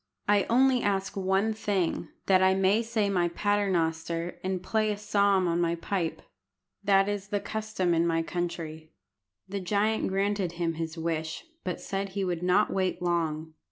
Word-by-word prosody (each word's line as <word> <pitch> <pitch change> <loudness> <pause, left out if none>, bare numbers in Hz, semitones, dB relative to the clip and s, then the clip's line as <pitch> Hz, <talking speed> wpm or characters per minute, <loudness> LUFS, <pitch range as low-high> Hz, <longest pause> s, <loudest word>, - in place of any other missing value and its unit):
I 205 -1 +4
only 255 +1 +4
ask 195 -1 -1
one 195 +3 +1
thing, 195 -6 -1 0.2
that 190 -1 +4
I 190 0 +5
may 195 +3 +3
say 225 -3 0
my 180 -3 +2
Paternoster 170 -4 0
and 185 -1 -2
play 215 +2 +1
a 205 - -3
psalm 200 -2 +2
on 170 0 +1
my 170 0 +1
pipe. 170 0 -3 0.6
That 195 -1 +4
is 205 -1 -3
the 205 0 -1
custom 215 -5 -1
in 170 +1 +2
my 165 -1 +1
country." 165 -2 -4 0.5
The 200 +1 -3
giant 205 +4 +1
granted 195 -2 0
him 170 -1 -1
his 165 +1 -5
wish, 160 - -3 0.2
but 180 - -3
said 195 0 -3
he 195 +1 -2
would 175 -2 -2
not 180 +4 +3
wait 185 -1 0
long. 160 -3 -1
190 Hz, 165 wpm, -28 LUFS, 170-205 Hz, 0.6 s, I